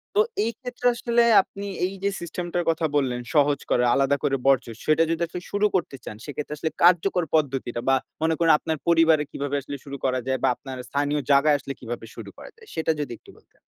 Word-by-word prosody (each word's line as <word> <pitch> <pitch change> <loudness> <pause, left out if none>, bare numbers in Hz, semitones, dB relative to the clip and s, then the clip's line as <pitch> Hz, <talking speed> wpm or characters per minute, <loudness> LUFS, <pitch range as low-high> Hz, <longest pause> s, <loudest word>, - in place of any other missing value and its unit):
তো - - +4 0.2
এই 230 - 0
ক্ষেত্রে 245 -1 -7
আসলে, 235 0 +1 0.2
আপনি 200 +1 -9 0.2
এই 190 - -3
যে 200 - +2
সিস্টেম 175 +1 -5
টার 175 - +1
কথা 165 0 +1
বললেন, 130 -4 0
সহজ 145 -1 +3
করে 125 - +3
আলাদা 135 +1 +3
করে 135 - +2
বর্জ্য, 135 -2 +3 0.2
সেটা 155 +1 +4
যদি 165 0 -1
আসলে 175 +2 -7
শুরু 205 +1 +1
করতে 170 -6 -1
চান। - - -7
সেক্ষেত্রে 150 0 -5
আসলে 160 +1 -2
কার্যকর 180 +1 +4
পদ্ধতিটা, 135 -5 -1
বা 135 - +5 0.3
মনে 160 0 +2
করুন 165 -1 +4
আপনার 160 -1 -2
পরিবারে 165 -2 +4
কিভাবে 145 0 -3
আসলে 140 +1 -7
শুরু 140 0 -6
করা 130 -1 +1
যায়? 130 -1 0
বা - - +4
আপনার 130 -1 -8
স্থানীয় 145 +2 0
জায়গায় 145 +1 +5
আসলে 135 +1 -6
কিভাবে 120 -1 -6
শুরু - - -8
করা - - -11
যায়? 450 -1 -17
সেটা 160 0 0
যদি 145 -4 -3
একটু - - -17
বলতেন? - - -27
150 Hz, 215 wpm, -24 LUFS, 140-170 Hz, 0.3 s, বা